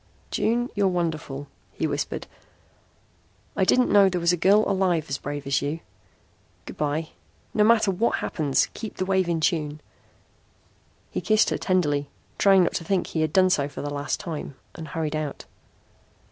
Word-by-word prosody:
"June, 240 +2 +1
you're 200 -1 +2
wonderful," 160 -6 -2 0.3
he - - -2
whispered. - - -3 1.3
"I - - +2
didn't 250 +6 +3
know 200 -2 +6
there 180 -1 -1
was 170 +1 +3
a - - +3
girl 200 +5 +4
alive 185 -5 +1
as 135 - -2
brave 145 0 -5
as 140 0 +1
you. 150 +4 -3 0.8
Good - - -8
by. 150 +2 -2 0.4
No 210 - +3
matter 220 -2 +4
what 205 +6 +1
happens, 145 -5 0
keep 220 -2 -7
the 185 - -1
wave 190 -2 +1
in 165 -1 0
tune." 155 -3 0 1.3
He - - -2
kissed 215 0 +3
her - - 0
tenderly, 145 -7 +1 0.3
trying 195 -2 +6
not - - 0
to 170 - -6
think 185 +2 0
he 160 - -2
had 155 -1 0
done 185 +2 +4
so 145 -5 +1
for - - -7
the 145 0 -4
last 145 0 -2
time, 160 -7 -6 0.2
and 160 -2 -8
hurried 155 -1 -3
out. 155 -2 -4
170 Hz, 175 wpm, -25 LUFS, 150-195 Hz, 1.3 s, know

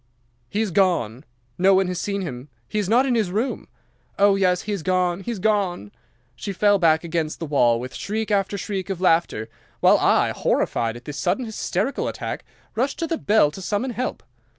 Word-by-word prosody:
"'"He 210 - -1
is 215 -4 -1
gone. 160 - +1 0.3
No 190 +1 +5
one 190 0 +3
has 180 -1 -3
seen 200 -1 -2
him. 130 -4 -7 0.2
He 210 - -2
is 200 -2 -2
not 245 +4 +4
in 260 - +1
his 220 -6 +1
room. 225 +5 -2 0.5
Oh, 200 0 +5
yes, 180 -2 +2
he 215 - -4
is 200 -4 -2
gone, 180 0 +1
he 195 - -7
is 235 - -2
gone!" 190 - 0 0.4
She 160 +12 -5
fell 205 +1 +3
back 160 -2 +3
against 165 -2 -2
the 165 - -5
wall 120 -6 +3
with 125 +1 -7
shriek 215 +1 -3
after 200 0 +1
shriek 195 -2 -4
of 190 -3 -3
laughter, 165 - +2 0.3
while - - +5
I, - - +3
horrified 115 -1 0
at 120 - -15
this 150 -1 -6
sudden 255 - 0
hysterical 220 +2 -2
attack, - - -5 0.3
rushed 260 +6 -1
to 335 - -1
the 330 0 -2
bell 205 -8 +3
to 190 - -9
summon 210 +7 -1
help. 245 +2 -4
190 Hz, 200 wpm, -23 LUFS, 165-210 Hz, 0.5 s, No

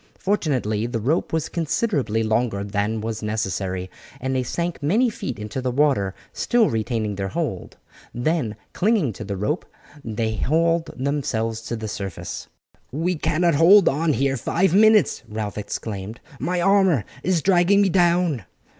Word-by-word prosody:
Fortunately 130 - 0
the 120 -1 -2
rope 140 +10 0
was 160 -1 0
considerably 150 - 0
longer 110 -2 0
than 105 +2 -1
was 110 0 -4
necessary, 95 -4 -2 0.3
and 130 +1 -2
they 130 - +1
sank 170 +8 -3
many 220 - +2
feet 130 - -5
into 105 +5 -5
the 130 - -1
water, 125 -8 +1 0.2
still 240 -3 +2
retaining 110 -1 -1
their 95 -1 -2
hold. 95 - -4 0.3
Then 120 -3 -1 0.2
clinging 195 - +1
to 105 - -7
the 100 -1 -4
rope 125 - -1 0.4
they 110 -1 -2
hauled 165 +4 +1
themselves 120 -5 -1
to 120 - -2
the 110 -1 -5
surface. 100 -3 -6 0.4
"We 165 +7 0
cannot 170 +2 +1
hold 175 +7 +7
on 155 +3 +2
here 135 0 +1
five 175 - +1
minutes," 215 0 +5
Ralph 105 -1 -4
exclaimed, 105 +1 -5 0.2
"my 180 0 -1
armour 190 - +3 0.2
is 180 -4 +1
dragging 190 +1 +4
me 195 - +2
down." 175 - +2
130 Hz, 150 wpm, -23 LUFS, 110-170 Hz, 0.4 s, hold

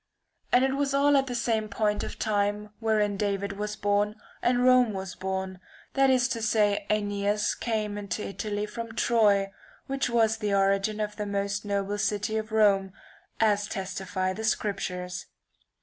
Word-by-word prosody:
And 250 +2 +5
it 270 0 0
was 275 0 0
all 285 +1 +4
at 270 -1 +3
the 245 - -3
same 225 -2 0
point 210 0 0
of - - -6
time 210 -1 -1
wherein 215 -3 +1
David 200 -1 -1
was 210 +1 -4
born 205 +1 +1 0.3
and 245 0 +2
Rome 255 -3 +5
was 190 -1 -5
born, 190 0 -4 0.3
that 270 0 +4
is 255 -2 +4
to 230 - -2
say 210 -2 +2
£neas 205 0 0
came 215 -3 -2
into 200 0 -4
Italy 205 +1 -3
from 230 +1 -7
Troy, 205 -5 +3 0.3
which 270 -2 -1
was 225 -2 +3
the 210 -2 0
origin 195 +2 +2
of 210 -1 -3
the 210 -1 -3
most 200 0 -2
noble 200 0 -1
city 210 +1 -1
of 215 0 -4
Rome, 200 -3 +3 0.5
as 205 -2 +2
testify 185 -1 -3
the 220 - -6
scriptures. 185 -4 -2
210 Hz, 165 wpm, -27 LUFS, 200-220 Hz, 0.5 s, And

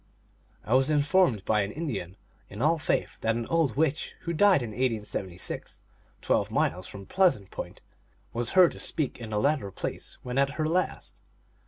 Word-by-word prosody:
I 115 - 0
was 130 +2 +4
informed 150 - +3
by 105 -1 +2
an 100 0 -2
Indian 105 - -4 0.3
in 100 - -9
all 155 +5 +3
faith - - -1
that 115 0 +1
an 115 0 -2
old 160 -9 +2
witch 155 -1 0
who 170 - -3
died 185 -4 +5
in 120 - -4
1876, 105 -7 -3 0.4
twelve - - +1
miles 90 +1 0
from 100 -1 -9
Pleasant 175 - +2
Point, - - -7 0.5
was 120 0 -2
heard 185 -2 +7
to - - -9
speak 150 -6 -1
in 115 -2 -7
the 105 -1 0
latter 140 -4 +1
place - - -5
when 125 +2 -1
at 140 0 +2
her 155 - 0
last. 180 +3 -2
130 Hz, 175 wpm, -28 LUFS, 105-160 Hz, 0.5 s, heard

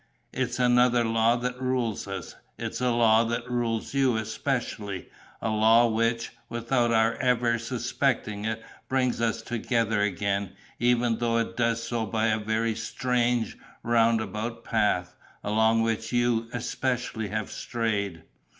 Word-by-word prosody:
It's 125 -2 -1
another 125 -1 +4
law 115 +1 +3
that 125 +1 -3
rules 125 -6 -1
us. 95 -4 -6 0.2
It's - - -4
a 125 - +2
law 115 -1 +4
that 120 +1 -2
rules 120 -2 -2
you 135 -4 +3
especially; 110 -3 -3 0.4
a 110 - 0
law 110 +2 +5
which, 115 +1 0 0.2
without 120 +1 +1
our 115 0 +3
ever 120 -2 +2
suspecting 115 -2 -1
it, 110 0 -3 0.3
brings 130 -3 +1
us 115 -2 0
together 115 -2 0
again, 100 0 -1 0.3
even 120 -1 +2
though 115 -1 +1
it 115 - -1
does 115 -1 +1
so 115 -1 -2
by 110 +2 +1
a 110 0 +1
very 110 +1 0
strange, 120 -1 -1 0.2
roundabout 115 0 +1
path, 105 -5 0 0.3
along 110 +2 +3
which 115 0 -1
you, 120 -2 +1
especially, 120 -2 -2
have 110 +1 -3
strayed. 100 -7 -2
115 Hz, 135 wpm, -27 LUFS, 110-120 Hz, 0.4 s, law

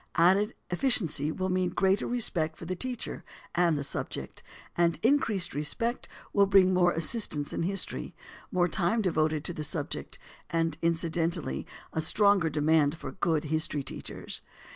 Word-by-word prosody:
Added 190 +6 +3 0.2
efficiency 175 - +1
will 185 +3 -2
mean 185 -1 +1
greater 195 +2 +1
respect 170 -10 +1
for - - -9
the 185 +2 -3
teacher 250 +5 -4 0.3
and 170 -3 +2
the 140 - -2
subject; 140 - -6 0.3
and 170 -1 +2
increased 230 -8 +2
respect 195 - -2 0.2
will 200 -1 +4
bring 190 -1 +5
more 180 -1 +4
assistants 160 -3 +2
in - - -2
history, 190 +2 -1 0.4
more 180 -1 +2
time 190 +5 +1
devoted 155 -4 +1
to 175 - -3
the 155 - -5
subject, - - -4 0.3
and 165 0 0
incidentally 165 - -1 0.3
a 160 - 0
stronger 200 0 +3
demand 155 0 +2
for - - -7
good 165 -5 0
history 155 -2 0
teachers. - - -5
170 Hz, 145 wpm, -29 LUFS, 155-195 Hz, 0.4 s, bring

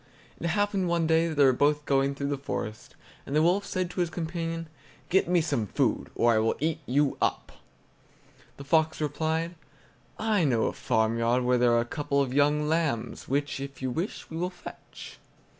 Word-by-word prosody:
It 170 - -2
happened 200 +1 +1
one 170 -1 +1
day 160 +1 +3
that 160 - -4
they 145 - +5
were 130 -1 +6
both 145 +3 +1
going 135 0 +1
through 140 0 -3
the 145 - -1
forest, 110 -5 -5 0.3
and 140 - -5
the 155 - +4
wolf 185 +4 +2
said 185 -2 -2
to - - -6
his 175 -2 +1
companion: 165 0 -4 0.4
"Get 185 0 +3
me 175 -1 +3
some 140 -9 -1
food, - - 0
or 120 0 +3
I 110 - +3
will 110 +1 +1
eat 155 +1 -1
you 140 +2 +1
up." - - -1 1.1
The 140 - -8
fox 160 +3 +2
replied: 160 +3 -1 0.6
"I 215 -4 +1
know 120 -7 +2
a - - -1
farmyard 115 +1 +1
where 125 0 +2
there 120 -1 +4
are 120 - +4
a - - -3
couple 140 +2 -1
of 135 -2 0
young 150 +2 +2
lambs, 155 -8 -1
which, 140 +1 -1
if 140 -1 -7
you 130 - -1
wish, 170 - -4
we 160 - -5
will 180 +2 -1
fetch." 180 -1 -11
150 Hz, 195 wpm, -27 LUFS, 130-165 Hz, 1.1 s, were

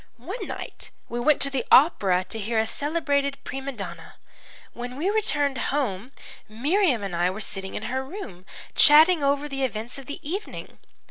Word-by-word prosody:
One 370 - -6
night - - -7 0.2
we 240 - -3
went 290 +4 +3
to 275 - -1
the 265 -3 -1
opera 195 - +5
to 225 - -4
hear 225 +2 -2
a 220 - +3
celebrated 285 +1 0
prima 270 +1 -5
donna. 175 -8 -8 0.6
When 245 +1 -6
we 360 +7 0
returned 290 - +1
home 250 -5 -2 0.4
Miriam 275 - +1
and 195 -3 -3
I 175 +1 +2
were 190 +3 -5
sitting 190 -2 -5
in - - -4
her 260 +3 -2
room, 265 - -9 0.3
chatting 310 +3 +7
over 280 +1 +1
the 270 -2 -3
events 235 +1 -3
of 270 - -12
the 285 - -6
evening. 390 +7 -6
265 Hz, 175 wpm, -25 LUFS, 220-295 Hz, 0.6 s, chatting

